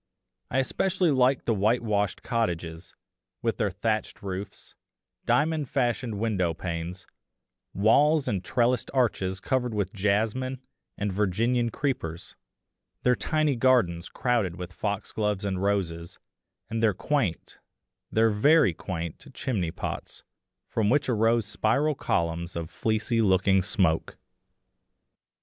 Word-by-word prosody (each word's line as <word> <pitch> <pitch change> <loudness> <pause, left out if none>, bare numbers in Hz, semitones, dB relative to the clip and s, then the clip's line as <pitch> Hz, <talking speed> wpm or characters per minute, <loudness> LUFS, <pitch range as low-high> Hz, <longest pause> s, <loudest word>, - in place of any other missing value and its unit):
I - - -1
especially 180 +6 +1
liked 130 -1 +3
the 115 - +2
whitewashed 105 -1 +1
cottages, 85 -7 -3 0.5
with 115 -1 0
their 105 - +1
thatched 110 +3 -2
roofs, 95 +1 -6 0.5
diamond 155 -3 +2
fashioned 120 -4 0
window 95 -6 0
panes, 85 +2 -5 0.7
walls 145 +9 +4
and 95 -3 -1
trellised 125 +1 +1
arches 95 -7 +1
covered 125 -1 -1
with 105 +1 -1
jasmine 110 +6 0 0.4
and 100 -1 -2
Virginian 115 +5 +1
creepers; 110 - -3 0.7
their 125 0 +4
tiny 155 -1 +1
gardens 115 -10 +2
crowded 115 -9 0
with 90 0 -7
foxgloves 105 0 -2
and 95 -2 -2
roses, 90 -4 -1 0.5
and 115 0 -3
their 110 -4 +3
quaint, 125 - -2 0.5
their 110 0 +3
very 110 - +4
quaint 85 -1 -6
chimney 100 -10 -1
pots, - - -6 0.4
from 105 -2 0
which 140 +1 +2
arose 115 -1 +2
spiral 120 +8 +1
columns 85 - -1
of 85 -1 -4
fleecy 115 +1 0
looking 95 -1 +3
smoke. 95 -5 0
105 Hz, 115 wpm, -27 LUFS, 95-125 Hz, 0.7 s, walls